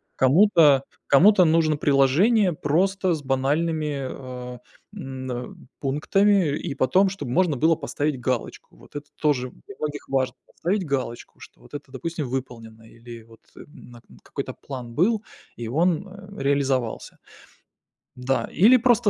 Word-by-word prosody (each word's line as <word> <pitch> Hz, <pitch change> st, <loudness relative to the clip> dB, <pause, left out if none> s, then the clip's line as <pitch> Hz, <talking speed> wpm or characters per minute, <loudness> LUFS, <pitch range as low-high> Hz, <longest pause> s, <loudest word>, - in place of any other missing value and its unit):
Кому-то 150 Hz, -1 st, +5 dB, 0.2 s
кому-то 185 Hz, +6 st, +6 dB
нужно 160 Hz, -1 st, +3 dB
приложение 165 Hz, -, +3 dB
просто 185 Hz, +5 st, 0 dB
с 150 Hz, -, -7 dB
банальными, 150 Hz, +3 st, 0 dB
а, 125 Hz, -2 st, -8 dB, 0.4 s
м, 130 Hz, -7 st, -6 dB
а, 125 Hz, 0 st, -6 dB, 0.3 s
пунктами, 160 Hz, +4 st, +2 dB
и 155 Hz, -6 st, -5 dB
потом 185 Hz, +10 st, +3 dB
чтоб 185 Hz, -8 st, -7 dB
можно 160 Hz, +2 st, +1 dB
было 160 Hz, +5 st, +3 dB
поставить 145 Hz, -2 st, -3 dB
галочку. 125 Hz, -1 st, -4 dB
Вот -, -, -19 dB
это 145 Hz, 0 st, -7 dB
тоже 130 Hz, -5 st, 0 dB
для 200 Hz, -, -15 dB
многих 150 Hz, -1 st, -5 dB
важно- 130 Hz, -2 st, 0 dB
поставить 190 Hz, +2 st, -2 dB
галочку, 130 Hz, -5 st, -4 dB
что -, -, -15 dB
вот -, -, -19 dB
это, 145 Hz, -2 st, -8 dB
допустим, 150 Hz, +2 st, -4 dB
выполнено 115 Hz, -4 st, -6 dB
или 115 Hz, 0 st, -12 dB
вот, 115 Hz, 0 st, -19 dB, 0.2 s
м, -, -, -11 dB, 0.3 s
на 120 Hz, -1 st, -14 dB
к -, -, -49 dB, 0.2 s
какой-то -, -, -6 dB
план 125 Hz, -4 st, -9 dB
был, 210 Hz, -, +1 dB, 0.3 s
и 120 Hz, -1 st, -5 dB
он, 170 Hz, -, 0 dB
а, 195 Hz, +1 st, -13 dB
реализовался. 135 Hz, -4 st, -1 dB, 1.0 s
Да, 130 Hz, +1 st, -1 dB
или 225 Hz, +9 st, +6 dB
просто 240 Hz, -3 st, +3 dB
145 Hz, 145 wpm, -24 LUFS, 130-180 Hz, 1.0 s, кому-то